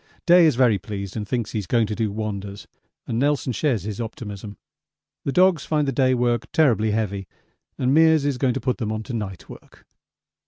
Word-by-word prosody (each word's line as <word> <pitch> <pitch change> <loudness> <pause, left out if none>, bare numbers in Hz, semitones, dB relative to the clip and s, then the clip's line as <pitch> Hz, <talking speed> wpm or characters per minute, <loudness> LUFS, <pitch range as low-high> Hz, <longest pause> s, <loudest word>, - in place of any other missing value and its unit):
Day 175 -1 +7
is 150 - +2
very 120 -5 +3
pleased 100 0 -6
and 105 -2 -4
thinks 120 -1 -2
he's 105 -4 -3
going 115 +1 +2
to 105 - -4
do 110 -1 -1
wonders, 100 -2 -5 0.4
and 115 - -2
Nelson 140 -2 0
shares 120 - 0
his 105 +2 -5
optimism. 105 -3 -7 0.7
The 140 - 0
dogs 180 -2 +3
find 150 -2 0
the - - +1
day 130 0 +2
work 120 -1 0
terribly 115 -8 +3
heavy 100 -3 -2 0.5
and 130 +2 +1
Meares 160 -2 +5
is 140 -3 -1
going 125 -3 +1
to - - -1
put 125 +1 -2
them 110 -3 -2
on 110 0 -3
to 120 - -7
night 100 -5 -5
work. - - -15
115 Hz, 200 wpm, -23 LUFS, 105-135 Hz, 0.7 s, Day